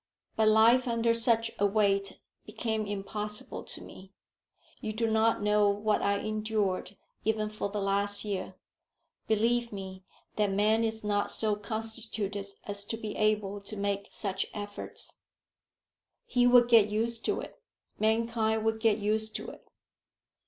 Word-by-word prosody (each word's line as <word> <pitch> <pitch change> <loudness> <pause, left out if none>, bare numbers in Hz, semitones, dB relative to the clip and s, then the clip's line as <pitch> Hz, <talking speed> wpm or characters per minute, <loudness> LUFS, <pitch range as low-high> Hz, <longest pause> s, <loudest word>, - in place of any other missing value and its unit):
"But 220 -1 +3
life 230 +4 +5
under 230 -1 +2
such 230 -1 +3
a 205 - +3
weight 200 -1 +1 0.3
became 220 -2 -2
impossible 210 +1 -2
to - - -6
me. 190 +1 -13 0.7
You 215 - -3
do 230 +2 0
not 220 -1 +2
know 210 0 +4
what 210 +1 +1
I 200 0 +2
endured 210 -3 -2 0.3
even 215 -1 0
for 215 -1 -3
the 205 0 -3
last 200 +1 +1
year. 200 -3 -4 0.7
Believe 230 +2 +1
me 190 -2 -7 0.3
that 210 -1 +2
man 215 +3 +3
is 220 -1 0
not 205 -1 0
so 215 -2 +2
constituted 215 -1 -3 0.2
as 205 0 -1
to 225 - -3
be 215 -2 -6
able 210 -2 0
to 205 +1 -8
make 200 0 -2
such 195 -3 -2
efforts." 205 -1 -6 1.1
"He 245 - +3
would 245 -1 +6
get 225 -3 +6
used 230 +2 -2
to - - 0
it. - - -10 0.4
Mankind 220 0 +1
would 225 0 +1
get 220 -2 +3
used 215 +1 -1
to - - -4
it." - - -16
215 Hz, 145 wpm, -29 LUFS, 205-225 Hz, 1.1 s, would